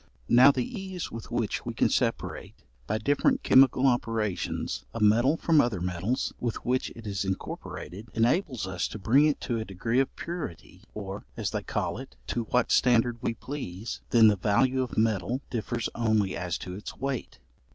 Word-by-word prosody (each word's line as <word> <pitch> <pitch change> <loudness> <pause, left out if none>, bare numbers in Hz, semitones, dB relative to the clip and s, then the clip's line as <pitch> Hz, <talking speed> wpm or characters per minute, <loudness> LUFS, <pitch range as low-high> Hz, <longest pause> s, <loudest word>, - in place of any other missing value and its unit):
Now 125 +3 +8
the 125 -3 -1
ease 190 -3 -6
with 115 -1 -8
which - - -1
we - - -5
can - - +3
separate, - - -1 0.3
by 110 - 0
different 145 - +1
chemical 130 0 +5
operations, 110 - -1
a - - -2
metal 120 +8 +4
from 160 -3 +4
other 120 -7 -1
metals 90 +7 -2
with 120 -2 -2
which 125 +1 0
it 115 - -11
is 100 -2 -2
incorporated, 95 +2 -6
enables 125 - +1
us 95 -2 -2
to - - -7
bring 120 +9 +4
it 150 - 0
to 120 -3 -2
a - - -2
degree 115 +5 -1
of 135 - 0
purity, 145 - -6
or, 100 -2 -6
as - - -2
they - - -2
call - - -2
it, 65 - -10
to 120 -2 -1
what 125 +2 +1
standard 120 -1 +3
we 115 - -1
please; 115 -8 -6
then 115 -2 +7
the 105 - +5
value 125 +7 +2
of 125 - -4
metal 110 +3 +1
differs 115 0 -2
only 110 -4 +1
as 90 -1 -2
to 90 -3 -7
its 100 +3 -8
weight. 135 -2 -4
115 Hz, 180 wpm, -28 LUFS, 100-130 Hz, 0.3 s, Now